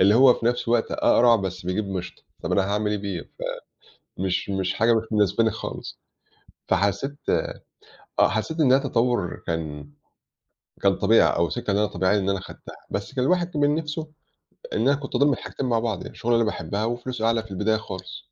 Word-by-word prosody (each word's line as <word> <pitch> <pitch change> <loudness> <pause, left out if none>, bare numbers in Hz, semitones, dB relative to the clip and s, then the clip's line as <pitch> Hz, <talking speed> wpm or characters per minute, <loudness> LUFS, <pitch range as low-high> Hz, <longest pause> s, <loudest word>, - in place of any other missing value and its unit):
اللي 100 +3 +6
هو 125 0 +7
في 115 - -3
نفْس 120 0 0
الوقت 115 -1 +2
أقرع 120 -1 +5
بس 95 -3 -5
بيجيب 100 +3 -1
مشط، 90 -2 -6 0.2
طَب - - -2
أنا 100 - +3
هاعمل 105 0 0
إيه 105 - 0
بيه 95 -4 -4
ف - - -18 0.8
مش 95 +1 -1
مش 95 -1 -1
حاجة 115 +1 +3
مش 115 0 +1
مناسباني 110 +1 +3
خالص، - - -7 0.7
فحسيت 100 +9 0
آآ، - - +1 0.7
آه - - +6
حسّيت 135 +10 -2
إن 135 -5 +5
هي 135 - +6
تطوّر 120 - 0
كان 75 -3 -4 0.9
كان 100 -1 +4
طبيعي 110 +3 +4
أو 85 0 +2
سكة 120 -4 -3
إن 100 - +2
أنا 105 - +3
طبيعيّة 95 +1 +1
إن 95 -1 -1
أنا 100 - 0
أخدتها، 95 - -11 0.2
بس 100 +6 -4
كان 130 -2 +1
الواحد 175 +4 +2
كمان 145 -1 +2
نفْسه 155 0 -4 0.6
إن - - 0
أنا 135 +5 +4
كنت 140 -1 -7
أضُم 145 +1 +4
الحاجتين 135 +1 -4
مع 120 -2 +2
بعض 115 -5 -1
يعني - - -8
الشُغلة 120 - -2
اللي 115 - +4
أنا 110 - +1
باحبها 100 +6 -3
وفلوسه 120 0 -3
أعلى 115 -1 +2
في 110 - -15
البداية 105 +3 +1
خالص. 95 -4 -8
110 Hz, 200 wpm, -24 LUFS, 95-125 Hz, 0.9 s, هو